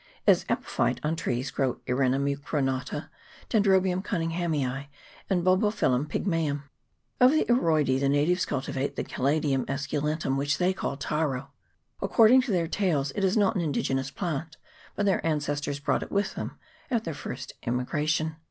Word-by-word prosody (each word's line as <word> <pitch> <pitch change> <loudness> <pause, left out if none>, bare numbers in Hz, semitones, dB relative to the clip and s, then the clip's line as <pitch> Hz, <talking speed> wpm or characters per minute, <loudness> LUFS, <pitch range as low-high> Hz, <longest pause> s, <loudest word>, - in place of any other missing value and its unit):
As - - +5
epiphytce - - 0
on 155 +2 0
trees 130 -5 -2
grow 130 -3 0
Earina 130 +1 +2
mucronata, 140 -1 -2 0.4
Dendrobium 190 -3 +3
Cunninghamii, 165 -7 -1 0.4
and 180 -3 +1
Bolbophyllum 185 - +2
pygmseum. 155 -5 -1 0.6
Of 250 - +8
the 310 +3 +2
Aroidece 155 - +2
the 140 0 +1
natives 155 +6 +2
cultivate 135 0 -2
the - - -2
Caladium 140 0 0
escu 140 +1 -2
lentum, 150 -2 -1
which 145 +2 0
they 180 +1 +2
call 140 -6 -3
taro. 140 -2 -2 0.5
According 240 +3 +6
to 255 -3 -3
their 170 -3 +1
tales, 160 -7 0
it 200 - -3
is 190 +3 +2
not 205 -1 +3
an 185 - +1
indigenous 135 -3 -1
plant, 160 +1 -4 0.4
but 205 - 0
their 195 -2 +2
ancestors 145 -2 -1
brought 145 - 0
it - - -7
with 200 -1 0
them - - -6 0.3
at 235 -4 0
their 165 - -4
first 135 -2 -7
immigration. 155 +6 0
150 Hz, 150 wpm, -27 LUFS, 140-185 Hz, 0.6 s, Of